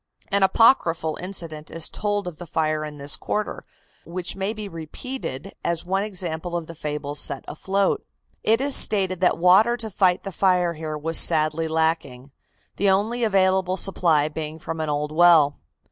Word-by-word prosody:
An 200 0 +1
apochryphal 190 - +3
incident 165 -5 -5
is 165 -1 +1
told 205 -2 -2
of 170 -4 -7
the 175 - -8
fire 155 -1 -1
in 150 -1 -7
this 140 +1 -3
quarter, 210 0 -4 0.4
which 175 +1 -4
may 195 +1 -2
be 215 -2 -6
repeated 165 - -7
as 170 0 0
one 190 +2 0
example 175 -4 -4
of 170 - -5
the 165 - -9
fables 150 -2 -4
set 140 -2 -2
afloat. 195 - -1 0.4
It 225 +1 +2
is 280 0 +1
stated 190 -4 +1
that 180 - +3
water 190 +8 +5
to 220 -2 -6
fight 185 -2 +2
the 195 - -5
fire 180 -1 +2
here 155 -1 -5
was 165 +2 +2
sadly 155 0 +3
lacking, 160 -5 -1 0.5
the 200 +1 +2
only 215 +5 +1
available 190 -3 +2
supply 165 -5 +2
being 155 0 -6
from 165 0 -6
an 155 -1 -2
old 150 0 -2
well. 160 -3 +5
170 Hz, 170 wpm, -23 LUFS, 155-195 Hz, 0.5 s, water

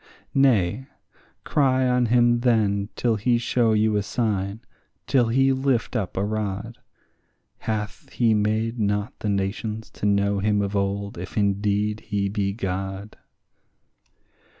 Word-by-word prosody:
Nay, 125 -3 +2 0.6
cry 130 -3 +2
on 125 -1 +2
him 120 0 +4
then 105 -4 +1
till 115 -3 +1
he 120 +4 +2
show 115 -1 +1
you 110 0 +2
a - - +1
sign, 105 -1 -2 0.4
till 125 -2 +3
he 135 +3 +3
lift 130 -2 0
up 100 -6 -2
a 100 - +1
rod; 105 +1 -3 0.8
Hath 105 -2 -4
he 115 -3 +2
made 110 +2 0
not 105 +2 0
the 105 - -2
nations 105 +3 -3
to 105 - -3
know 100 0 +2
him 105 0 +1
of 100 +1 -3
old 100 -1 -2
if 90 +4 -7
indeed 105 +1 +1
he 100 -2 -2
be 100 -1 -1
God? 95 0 -4
105 Hz, 135 wpm, -24 LUFS, 100-120 Hz, 0.8 s, him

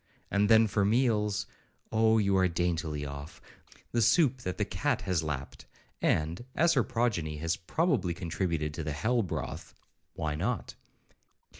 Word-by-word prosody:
—And 100 0 +2
then 110 0 +7
for 105 -1 +1
meals—Oh 110 0 0
you 100 -2 +2
are 95 -1 +4
daintily 85 -4 -1
off!—The 70 +10 -7
soup 135 - +4
that 90 -5 -4
the - - 0
cat - - -1
has 90 -4 0
lapped; 70 -4 -5 0.3
and 80 +7 0
(as 170 +1 +4
her 135 - +4
progeny 110 - -1
has 85 +3 -1
probably 105 - 0
contributed 85 -3 -2
to 80 - -4
the 75 -1 -3
hell 115 +11 +1
broth) 95 - -5 0.4
why 75 -1 -2
not? 100 +10 -2
95 Hz, 140 wpm, -30 LUFS, 80-115 Hz, 0.4 s, then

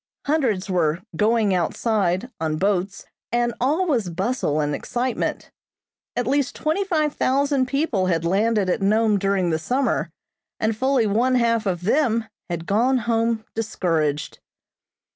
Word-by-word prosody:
Hundreds 250 -11 0
were 170 -3 0
"going 215 -2 +2
outside" 190 +4 0
on 155 -1 -1
boats, 195 +1 -1 0.3
and 240 0 +1
all 305 +9 +2
was 240 - 0
bustle 170 - -1
and 150 -1 0
excitement. 245 - -3 0.6
At 245 - 0
least 270 +1 0
twenty 315 +6 0
five 310 -6 0
thousand 275 0 +1
people 260 - 0
had 165 -2 0
landed 205 +3 +2
at 185 +4 0
Nome 215 +1 +3
during 195 -3 +1
the 160 - 0
summer, 245 - 0 0.5
and 220 0 0
fully 260 0 +2
one 235 +5 +2
half 230 -3 +2
of 180 -2 -2
them 230 0 +2 0.2
had 170 -1 -4
gone 240 +8 +2
home 230 -1 0
discouraged. 165 -9 -1
220 Hz, 140 wpm, -23 LUFS, 185-255 Hz, 0.6 s, Nome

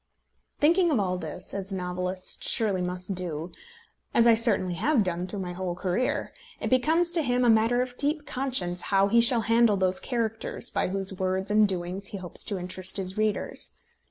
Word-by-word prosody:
Thinking 340 +4 +4
of 280 -8 +2
all 185 -2 -1
this, 185 0 -6
as 195 0 -3
a - - -2
novelist 180 0 -4
surely 200 -5 +1
must 180 +2 -3
do, 175 -2 -5 0.6
as 235 - +5
I 235 - +7
certainly 225 -5 +1
have 250 - +2
done 180 -1 -2
through 195 +1 -5
my 180 -1 -5
whole 180 -1 -3
career, 185 +7 -1 0.3
it - - -3
becomes 320 +7 +3
to 340 -2 +2
him 250 -3 +1
a 235 - +6
matter 225 +3 +3
of 250 -1 -9
deep 295 +1 0
conscience 245 -10 -1
how 195 0 +3
he 235 +2 +5
shall 235 0 +5
handle 230 -2 +3
those 185 0 +2
characters 225 -3 -2
by - - 0
whose 195 +1 -2
words 190 +1 -2
and 210 0 +5
doings 185 +1 -4
he 200 - -6
hopes 180 -2 -5
to 200 - -2
interest 185 +1 -2
his 190 -1 -3
readers. 215 -1 -2
195 Hz, 190 wpm, -27 LUFS, 185-235 Hz, 0.6 s, I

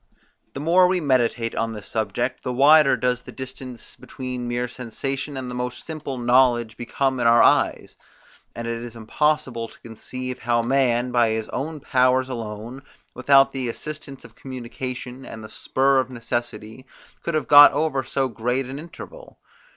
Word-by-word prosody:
The - - -4
more 175 +5 +4
we 185 0 +1
meditate 120 -5 +1
on 115 0 -2
this 105 -2 -8
subject, 120 +3 -2
the 125 - -3
wider 140 +1 +6
does 125 +1 0
the - - -11
distance 130 -2 -8
between 125 -2 -6
mere 120 +1 -1
sensation 135 +4 -5
and 130 -1 -5
the 125 - -6
most 125 0 -4
simple 155 -4 -6
knowledge 120 -2 +3
become 130 +3 -1
in 120 - +2
our 120 0 +6
eyes; - - +2 0.6
and 115 0 -5
it 115 0 -3
is 120 -1 -8
impossible 125 +1 -1
to - - -18
conceive 125 +3 -7
how 120 -1 +1
man, 125 -1 +1
by 120 -2 +3
his 110 0 -2
own 150 +1 -4
powers 130 0 +2
alone, 115 +1 -6 0.3
without 135 +1 +4
the 130 -3 -3
assistance 145 +1 -7
of - - -14
communication, 125 0 -7
and 110 -3 -9
the 110 - -9
spur 135 0 +1
of 130 -1 -1
necessity, 120 0 -5 0.3
could 170 - -3
have 155 - -1
got 145 0 +10
over 145 -3 0
so 135 +1 -1
great 125 +3 -2
an 135 +3 -7
interval. - - -11
125 Hz, 165 wpm, -23 LUFS, 120-135 Hz, 0.6 s, got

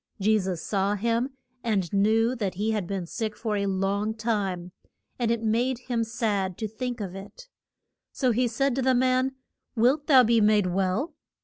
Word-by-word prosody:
Je 215 +2 +3
sus 185 -4 -3
saw 200 0 0
him, 230 +4 0 0.3
and 200 -7 -1
knew 220 +4 +3
that 200 -6 -2
he 210 +4 0
had 210 -5 -2
been 195 -2 -3
sick 215 +4 -4
for 220 -2 -2
a 200 -1 0
long 200 +3 0
time, 200 -6 -2 0.5
and 235 -2 +1
it 230 -1 0
made 235 +4 +1
him 240 -1 -2
sad 210 -5 -1
to 220 - -3
think 245 +3 -5
of 195 -4 -5
it. 200 - -10 0.6
So 255 -3 +1
he 245 +2 +2
said 265 +4 0
to - - +1
the 260 0 +3
man, 255 +1 +2 0.4
Wilt 260 +6 +2
thou 265 -4 +7
be 230 -1 +3
made 210 -1 +4
well? 190 - 0
220 Hz, 185 wpm, -26 LUFS, 195-245 Hz, 0.6 s, thou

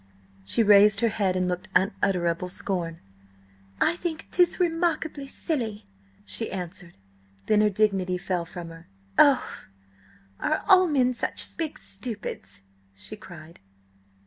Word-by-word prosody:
She 225 - +2
raised 205 0 +6
her 230 - +3
head 195 -4 0
and 185 0 0
looked 180 +1 -3
unutterable 180 -2 +1
scorn. 175 -3 -3 0.8
"I - - +3
think 330 -3 -4
'tis 355 0 +3
remarkable 330 -4 0
silly," 230 -9 -3 0.4
she 95 -1 -3
answered. 180 -1 -7 0.5
Then 210 -1 +3
her 210 - +4
dignity 195 -3 +1
fell 180 -2 -2
from 170 0 -8
her. 165 +1 -13 0.3
"Oh, 285 -4 +6 0.9
are 310 - 0
all 375 -2 +7
men 255 -5 +2
such 245 - -2
big 320 -2 -4
stupids?" 195 - -6 0.3
she 155 - -7
cried. 170 -5 -13
200 Hz, 125 wpm, -26 LUFS, 180-270 Hz, 0.9 s, all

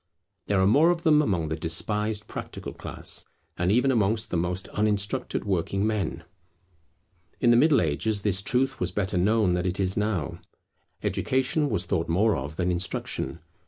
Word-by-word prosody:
There 100 -2 +2
are 95 - +4
more 145 - +5
of 170 -1 0
them 150 -3 +5
among 85 - 0
the 80 - -1
despised 105 +7 -1
practical - - -7
class, - - -6 0.3
and 90 +2 +1
even 125 +5 +3
amongst 110 -1 +1
the - - -1
most 90 +2 -1
uninstructed 105 -1 -1
working 95 +1 0
men. 105 -6 -2 1.2
In 120 - +4
the - - +6
Middle 145 +4 +5
Ages 100 +7 0
this 100 -2 +1
truth 130 +4 0
was 90 0 0
better 95 -1 -1
known 105 0 +3
than 90 +1 0
it 90 +2 -2
is 95 -1 0
now. 90 -6 -1 0.6
Education 135 +3 0
was 95 -6 0
thought 85 -1 -1
more 100 +5 +3
of 70 +1 -5
than 90 +1 0
instruction. 85 0 -3
100 Hz, 165 wpm, -26 LUFS, 90-110 Hz, 1.2 s, the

